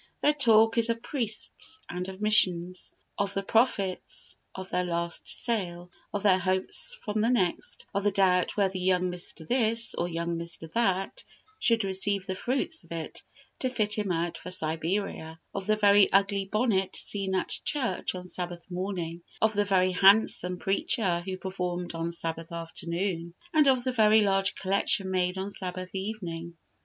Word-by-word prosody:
Their 295 - +5
talk 225 -5 +5
is 230 0 +4
of 230 0 -1
priests 245 - -2
and 180 +1 -4
of 190 0 -9
missions; 185 -4 +2 0.3
of 200 0 -1
the 195 - -1
profits 200 -4 0 0.2
of 190 0 -6
their 180 - +1
last 170 -1 -2
sale, 180 -6 -1 0.2
of 205 0 -3
their 190 -2 +5
hopes 190 - -1
from 210 -1 0
the 225 - +2
next; 190 -9 -1
of 200 0 0
the 205 - +4
doubt 185 -2 +2
whether 195 -2 +1
young 180 0 +2
Mr. 175 -2 -7
This 230 -2 +1
or 175 - -1
young 170 0 -2
Mr. 165 -1 -6
That 195 - 0 0.4
should 230 -2 +4
receive 195 0 +2
the 190 - -2
fruits 265 - -2
of - - -22
it 165 -1 -5 0.4
to 255 - 0
fit 215 -4 0
him 210 -3 0
out 170 0 -1
for 180 - -8
Siberia; 165 0 -2
of 195 0 -4
the 215 - +4
very 205 -1 +5
ugly 195 0 +2
bonnet 205 -2 0
seen 195 -2 -1
at 185 - 0
church 230 -11 -2
on 180 0 -7
Sabbath 175 -1 -6
morning; 175 -2 -3 0.2
of 220 0 +3
the 205 0 +1
very 185 -2 +3
handsome 190 -1 +4
preacher 195 -1 +1
who 190 -1 -3
performed 180 -2 -4
on 165 0 -2
Sabbath 165 -1 -4
afternoon; 170 +1 -4 0.2
and 305 -2 +5
of 260 -2 +4
the 260 - 0
very 220 -2 +5
large 195 -1 +2
collection 195 0 +1
made 180 0 0
on 195 +2 -3
Sabbath 185 -1 -6
evening. 175 -4 -5
190 Hz, 170 wpm, -28 LUFS, 180-210 Hz, 0.4 s, Their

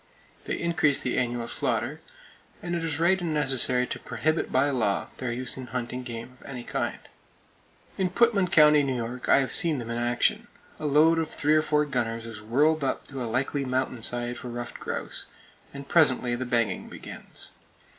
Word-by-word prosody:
They - - -2
increase 165 -4 +2
the 125 - -2
annual 120 -2 -1
slaughter; - - -2 0.6
and 175 0 -4
it 170 -1 -1
is 160 -1 -2
right 180 +3 +3
and 165 -3 -1
necessary 130 -3 +2
to - - -5
prohibit 155 +1 -1
by 140 +2 +3
law 110 -7 0
their 125 -2 -3
use 125 +1 -1
in 130 -1 -7
hunting 125 0 -4
game 120 +1 -8
of - - -13
any 125 -3 -6
kind. - - -2 1.0
In 185 -1 +2
Putman 205 -2 +3
County, 150 -3 +7
New 135 -2 -1
York, 120 +1 -4
I 140 - +6
have 135 - -2
seen 165 -3 +3
them 115 -2 -5
in 115 - -2
action. 120 0 +1 0.3
A 155 - -2
load 155 +3 +5
of 160 - -1
three 150 +1 +1
or 155 - +5
four 150 -1 +2
gunners 115 -4 -2
is 110 -2 -8
whirled 145 +8 +2
up 135 - -2
to 135 -2 -6
a 120 - -3
likely 135 +4 -1
mountain 130 -2 -1
side 120 +1 +1
for - - -8
ruffed 120 0 -6
grouse, - - -4 0.4
and 140 0 -9
presently 130 -7 +3
the 125 +1 -3
banging 120 -3 0
begins. - - -10
130 Hz, 190 wpm, -27 LUFS, 120-155 Hz, 1.0 s, County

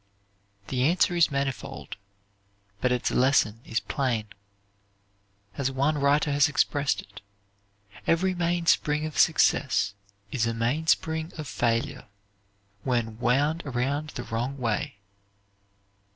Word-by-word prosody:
The 125 -1 -1
answer 175 +5 +3
is 170 -2 +4
manifold, 140 -2 -4 0.8
but 125 - +1
its 125 -1 0
lesson 125 -4 +2
is 115 - -1
plain. 120 -7 -2 1.3
As 135 -1 +1
one 140 +3 0
writer 145 +2 +3
has 145 0 +4
expressed 145 0 +1
it, 100 0 -14 0.9
"_Every 185 +3 +2
mainspring 170 -3 +1
of 155 - -4
success 135 -9 +3 0.4
is 115 -2 0
a 115 - -1
mainspring 160 +6 0
of 155 -3 -5
failure, 115 -2 -1 0.8
when 115 -3 -1
wound 145 +7 +2
around 140 +3 -2
the 125 - -4
wrong 120 +5 -3
way. 115 -5 -2
140 Hz, 110 wpm, -27 LUFS, 120-155 Hz, 1.3 s, is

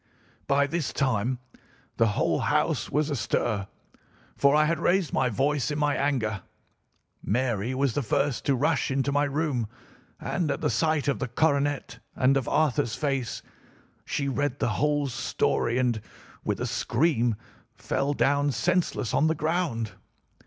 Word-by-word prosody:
"By 140 0 +3
this 160 0 -2
time 125 -2 0 0.6
the 115 - +4
whole - - +2
house - - +1
was 150 +1 0
astir, 110 -5 -1 0.7
for 140 +1 +4
I 155 0 +5
had 165 +2 0
raised 180 -2 +1
my 130 - +2
voice 135 +4 0
in 150 - -2
my 145 -1 +1
anger. 120 -8 0 0.8
Mary 120 0 -1
was 135 -2 +1
the 145 - 0
first 140 +2 0
to 140 -2 +3
rush 145 +2 +1
into 135 +1 0
my 145 +1 +2
room, 140 -5 -1 0.5
and, 170 -5 -1
at - - -2
the - - +1
sight 155 -3 +1
of 140 - +1
the 130 - -2
coronet 145 +2 0 0.2
and 130 +2 +3
of 135 -2 0
Arthur's 130 -7 +1
face, 135 -5 -2 0.6
she 140 - -2
read 140 0 -1
the - - 0
whole 145 +5 +1
story 120 -1 0
and, 120 -4 +1 0.4
with - - -1
a - - -1
scream, 120 -2 +1 0.4
fell 140 +1 -1
down 145 +1 +2
senseless 175 - 0
on 155 - +3
the 160 - +1
ground. 155 - -1
140 Hz, 150 wpm, -27 LUFS, 125-150 Hz, 0.8 s, I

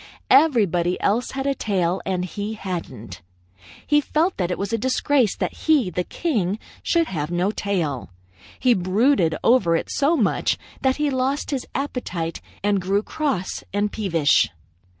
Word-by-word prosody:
Everybody 195 - +4
else 225 +5 0
had 270 0 -3
a 280 - +2
tail, 190 -7 -1
and 180 -1 -1
he 205 +4 -5
hadn't. 130 - -6 0.6
He 295 0 +3
felt 320 +6 0
that 180 -3 -1
it 180 - -2
was 200 +3 -3
a - - +2
disgrace 260 -1 +2
that - - -2
he, 285 -12 +2
the 180 +2 -1
king, 210 - -1 0.2
should 335 -1 +2
have 155 - -3
no 175 +3 0
tail. 170 - -2 0.5
He 250 -2 +4
brooded 185 - +2
over 205 -9 +4
it - - -2
so 295 +4 +2
much 220 -7 +1 0.2
that 265 -1 +2
he 300 -1 0
lost 265 +3 -1
his 270 -3 -3
appetite 190 - -3 0.2
and 200 -1 +2
grew 195 +3 +1
cross 275 - -2
and 205 0 0
peevish. 170 -9 +2
205 Hz, 155 wpm, -23 LUFS, 180-265 Hz, 0.6 s, Everybody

